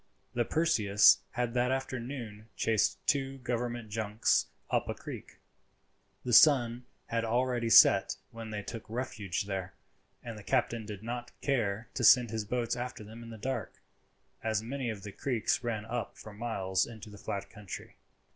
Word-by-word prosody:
The 120 -1 +1
Perseus 110 -12 +5
had 120 -2 -1
that 125 0 +2
afternoon 125 -4 -4
chased 110 -2 +2
two 135 -2 +1
government 120 -3 -3
junks 105 0 +1 0.2
up - - +1
a - - -2
creek. - - -9 0.9
The 125 - -1
sun 125 -4 +6 0.2
had 115 0 -1
already 120 0 0
set 110 - +7 0.2
when 115 -1 -8
they 105 -1 -4
took 115 +2 -6
refuge 115 -2 -3
there; 95 -2 -4 0.5
and 115 -3 -7
the - - -12
captain 115 -2 0
did 105 -1 -7
not 120 +1 -6
care 115 -5 0
to 125 - -3
send 120 -1 +7
his 110 -2 -2
boats 120 +2 -1
after 120 -2 -5
them 110 +3 -11
in 115 - -9
the 115 - -8
dark, 130 +5 -4 0.6
as 110 -1 0
many 130 +1 -3
of 105 -4 -5
the 105 - -6
creeks 125 +2 -1
ran 110 -3 -2
up 115 +2 -4
for 110 - -10
miles 100 -4 -1
into 110 -2 -10
the 105 - -12
flat 100 -1 -5
country. 105 -3 -9
115 Hz, 165 wpm, -31 LUFS, 105-125 Hz, 0.9 s, set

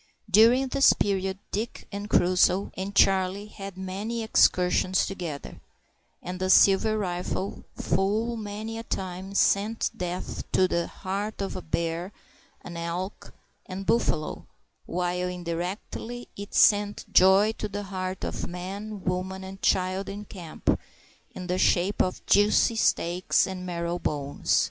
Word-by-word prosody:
During 235 +6 +6
this 275 +1 +5
period, 190 -1 -1
Dick, 220 +4 -4
and 205 +1 -5
Crusoe, 185 +1 +3
and 195 +2 -5
Charlie 195 +1 +3
had 195 -3 -8
many 200 +5 -4
excursions 185 -3 +3
together, 170 -7 -6 0.6
and 180 +1 -5
the 185 0 -1
silver 200 +3 +5
rifle 185 0 -3
full 210 +6 0
many 220 +1 -5
a - - -6
time 190 -1 -5
sent 210 +3 +2
death 180 -3 -4
to 185 - +4
the 170 -1 -1
heart 200 +3 -4
of 190 -4 -5
bear, 170 +3 -1 0.5
and 170 -1 -7
elk, 175 +4 -5 0.4
and 195 +1 -6
buffalo; 175 -10 0 0.4
while, 180 0 -1
indirectly, 180 +7 -5
it 200 +1 -8
sent 205 -1 +4
joy 195 +3 +6
to 210 - -3
the 205 +1 -4
heart 185 -1 -4
of - - -3
man, 195 +3 -6
woman, 185 +1 -2
and 190 +1 -9
child 185 +1 +1
in 205 +1 -6
camp, 175 -6 -2 0.6
in 185 - -6
the 180 +1 -1
shape 185 +4 +2
of 185 - -2
juicy 205 +3 +4
steaks 180 -4 +2
and 185 -1 -6
marrow 170 0 -2
bones. 145 -3 0
190 Hz, 135 wpm, -27 LUFS, 180-205 Hz, 0.6 s, During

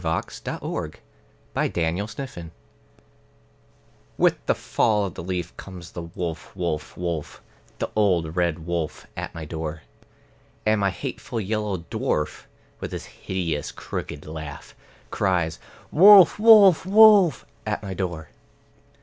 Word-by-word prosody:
The 80 -2 -3
Red - - -29
Wolf 100 +10 -4 1.8
With - - +2
the - - +3
fall 105 -3 +1
of 95 - -5
the - - -7
leaf 90 -1 -4
comes 90 -3 -10
the 85 - -6
wolf, 85 0 -6
wolf, 85 -5 -3
wolf, 85 -4 -4 0.3
The - - -3
old 90 -7 +1
red 85 -3 0
wolf 85 -2 -3
at - - -6
my 80 -1 -6
door. 80 -1 -5 0.8
And 110 -1 +2
my 100 - +3
hateful 115 +5 -5
yellow 105 -4 -2
dwarf, 75 - -2 0.3
with - - -6
his - - -5
hideous 85 -6 -4
crooked 75 - -6
laugh, 75 -2 -8 0.4
Cries 90 -5 0 0.3
"Wolf, 195 +3 +8
wolf, 210 -6 +7
wolf!" 200 - +6 0.2
at 105 0 -2
my 95 -2 -5
door. 85 -5 -4
90 Hz, 120 wpm, -24 LUFS, 80-110 Hz, 1.8 s, Wolf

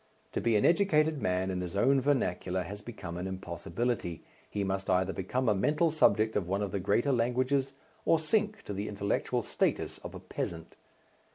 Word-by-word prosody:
To - - -2
be 115 -2 +2
an 105 - +3
educated 160 -5 +3
man 95 +1 0
in 90 -1 -2
his 90 +1 -5
own 135 +7 +4
vernacular 95 -9 0
has 100 +4 -7
become 100 -6 -7
an 90 +1 -3
impossibility, 95 +1 -3 0.3
he 100 - -2
must 95 0 -2
either 95 0 +2
become 125 +7 -1
a 105 - +5
mental 150 - +2
subject 110 -8 +3
of 95 -4 0
one 100 +3 0
of 100 - -3
the 100 - -1
greater 115 +9 +2
languages 130 +3 +1 0.3
or 165 - +4
sink 210 +6 0
to 105 - -5
the 100 +2 -3
intellectual 100 0 -1
status - - -1
of - - -8
a - - -6
peasant. 80 -1 -5
105 Hz, 185 wpm, -30 LUFS, 95-135 Hz, 0.3 s, a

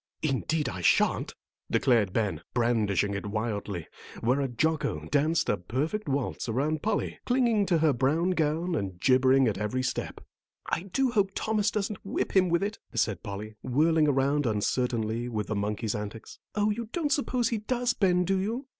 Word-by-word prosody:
"Indeed, 155 +1 0
I 90 - -4
shan't," - - +2 0.3
declared 115 -7 +3
Ben, 100 -7 -1
brandishing 110 -5 +1
it 100 +1 -4
wildly, 105 -5 -3 0.4
whereat 125 0 0
Jocko 155 - 0
danced 160 +4 +2
a 105 - +1
perfect 145 - -2
waltz 135 -3 -2
around 145 +6 0
Polly, 215 -1 -1
clinging 235 -5 +2
to 175 - +3
her 155 -2 +3
brown 150 +8 +1
gown 165 +1 0
and 95 - -3
gibbering 130 +2 +4
at 100 -3 -1
every 125 +5 -1
step. - - -3 0.5
"I 190 +3 -3
do 265 +5 +2
hope 200 -4 +1
Thomas 215 -1 +1
doesn't 205 -1 -3
whip 195 - -3
him 185 -2 +5
with 170 +2 +2
it," 210 +2 -3 0.2
said 105 -5 0
Polly, 105 +1 -6
whirling 155 +4 +3
around 140 0 +2
uncertainly 115 +1 -1
with 105 -3 -2
the 110 - -3
monkey's 105 +1 -1
antics. 105 0 -7 0.2
"Oh, 210 0 +2
you 225 +1 -4
don't 315 -4 -1
suppose 255 -4 +1
he 230 - -1
does, 245 +3 0
Ben, 180 -5 +2
do 195 +1 +1
you?" 230 +8 -2
140 Hz, 170 wpm, -28 LUFS, -, 0.5 s, him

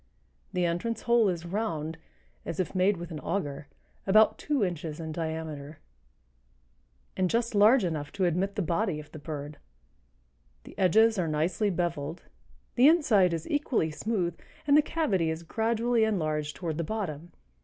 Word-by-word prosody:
The 180 -1 0
entrance 180 +7 -2
hole 235 -3 +4
is 175 -2 -3
round, 165 -5 -3 0.4
as 165 - -5
if 175 -6 -1
made 190 +1 +2
with 170 0 -7
an 155 - -5
auger, 145 -6 -3 0.4
about 215 +3 +5
two 290 -6 0
inches 165 -4 -3
in 160 -1 -5
diameter, 160 -2 -5 1.4
and 185 -1 +1
just 230 +2 0
large 215 +4 +6
enough 155 -4 -3
to 190 - 0
admit 185 +4 0
the 200 - 0
body 170 0 0
of 150 - -11
the 155 - -9
bird; 145 -1 -7 1.0
the - - -13
edges 220 +3 +4
are 170 - 0
nicely 160 +7 0
beveled, 170 -3 -3 0.5
the 255 +3 +6
inside 230 - +4
is 165 -1 -3
equally 270 - 0
smooth, 180 0 -2 0.3
and 285 -1 +4
the 300 - +7
cavity 235 - 0
is 160 +1 -4
gradually 230 +4 +1
enlarged 155 -8 -1
toward 165 -3 -4
the - - 0
bottom. 175 -4 -4
175 Hz, 155 wpm, -28 LUFS, 160-220 Hz, 1.4 s, the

